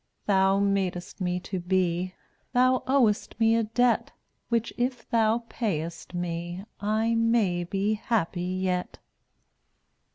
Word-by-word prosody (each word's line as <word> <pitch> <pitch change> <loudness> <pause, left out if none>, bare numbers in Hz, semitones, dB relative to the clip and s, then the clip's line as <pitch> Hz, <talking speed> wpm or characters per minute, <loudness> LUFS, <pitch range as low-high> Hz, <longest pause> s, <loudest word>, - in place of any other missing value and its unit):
Thou 195 -1 +4
madest 195 -3 -1
me 180 0 0
to 185 0 -4
be; 180 0 0 0.4
Thou 255 +1 +4
owest 240 -6 +2
me 225 0 +4
a 230 - +3
debt, 230 +2 +1 0.4
Which 235 -1 0
if 245 -1 -2
Thou 230 0 +2
pay 205 -12 -1
est 170 +2 -8
me 175 +2 -4
I 220 +3 +1
may 230 -6 +2
be 195 +4 0
happy 205 -5 -1
yet. 180 0 -2
200 Hz, 125 wpm, -27 LUFS, 180-230 Hz, 0.4 s, Thou